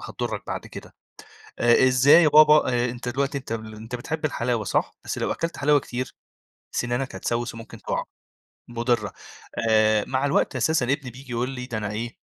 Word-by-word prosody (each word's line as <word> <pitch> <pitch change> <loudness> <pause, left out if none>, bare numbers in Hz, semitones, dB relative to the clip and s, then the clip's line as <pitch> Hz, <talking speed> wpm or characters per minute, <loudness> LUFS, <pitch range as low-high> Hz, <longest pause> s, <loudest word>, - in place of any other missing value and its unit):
هتضُرّك - - -4
بعد - - -5
كده. - - -11 0.7
آآ 120 +2 +5
إزاي 135 +6 +6
يا - - +5
بابا؟ 150 -3 +6
آآ 120 0 +1
أنت 125 0 -5
دلوقتي 140 +2 -1
أنت 135 - -9
أنت 110 +1 -6
بتحب 155 +6 -4
الحلاوة 120 -6 -1
صح؟ - - -1
بس - - -4
لو - - -1
أكلت 165 0 -3
حلاوة 145 0 +4
كتير، 125 0 -5 0.6
سِنانك 120 +2 -1
هتسوِّس، 120 0 -2
وممكن 115 0 -10
تُقَع. - - -2 0.6
مضرة. 120 -2 -1 0.6
آآ 110 -1 +4
مع 130 +1 0
الوقت 140 -1 +1
أساسًا 135 +2 +2
ابني 135 0 -1
بييجي 125 +1 -11
يقول 120 +2 -1
لي 125 -2 -6
ده 115 -4 -4
أنا 105 -1 -3
إيه، 115 +3 -5
125 Hz, 175 wpm, -24 LUFS, 115-135 Hz, 0.7 s, إزاي